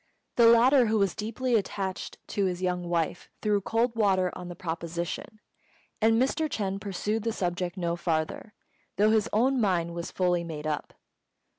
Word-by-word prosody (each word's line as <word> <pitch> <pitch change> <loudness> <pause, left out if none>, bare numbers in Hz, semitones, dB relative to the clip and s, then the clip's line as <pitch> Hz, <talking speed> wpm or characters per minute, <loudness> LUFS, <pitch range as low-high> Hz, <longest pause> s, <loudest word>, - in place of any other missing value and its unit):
The 235 -1 +6
latter, 240 +2 +6
who 220 +1 +2
was 195 -3 +2
deeply 235 +4 -2
attached 195 -3 -2
to 200 - 0
his 180 -1 -1
young 180 -1 -1
wife, 170 0 -1
threw 210 -2 +2
cold 230 +4 0
water 190 -5 +2
on 180 -1 -7
the 175 - -7
proposition, 170 +4 -5 0.6
and 225 +1 +4
Mr. 300 +5 +1
Ch'êng 195 -5 -2
pursued 210 +3 -2
the 230 +2 -1
subject 175 -2 -2
no 170 -2 -1
farther, 165 +5 -2 0.4
though 210 +2 +4
his 220 0 +2
own 250 +4 +2
mind 175 -5 +1
was 170 0 -5
fully 180 -2 +1
made 155 -3 -6
up. 150 -1 -3
195 Hz, 165 wpm, -28 LUFS, 175-225 Hz, 0.6 s, The